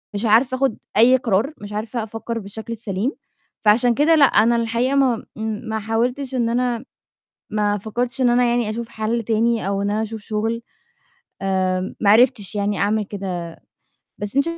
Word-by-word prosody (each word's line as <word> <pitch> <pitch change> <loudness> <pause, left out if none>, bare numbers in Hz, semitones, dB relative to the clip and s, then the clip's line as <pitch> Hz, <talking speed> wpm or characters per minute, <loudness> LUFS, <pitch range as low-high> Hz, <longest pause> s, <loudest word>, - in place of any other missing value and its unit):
مش 205 +3 -1
عارفة 240 +4 +4
آخد 270 -4 0 0.2
أي 250 +4 +6
قرار، 235 +4 0
مش 205 0 -8
عارفة 220 +2 -3
أفكر 225 +1 -5
بالشكل 220 +3 -6
السليم. 215 +2 -2 0.5
فعشان 235 +3 +5
كده 310 +3 +4
لأ، 295 -3 +7
أنا 235 -1 +4
الحقيقة 235 +4 0
ما 255 -5 +2
امم، 220 0 -3
ما 220 0 -1
حاولتش 245 +5 -1
إن 235 -2 +1
أنا 245 0 -1 0.7
ما 210 -1 +1
فكرتش 240 +5 -3
إن 250 - +4
أنا 245 +1 +3
يعني 235 -2 0
أشوف 230 +1 -5
حل 225 +2 -2
تاني 225 -1 +1
أو 200 0 -1
إن 200 - 0
أنا 215 - 0
أشوف 220 0 -6
شغل. 220 +2 -2 0.8
آآ، 185 -1 -1
ما 200 - +3
عرفتش 215 -3 +3
يعني 205 0 -1
أعمل 210 +1 +1
كده. 180 -4 -6 0.6
بس 205 +4 -5
أنتِ 280 - +5
225 Hz, 175 wpm, -21 LUFS, 210-240 Hz, 0.8 s, لأ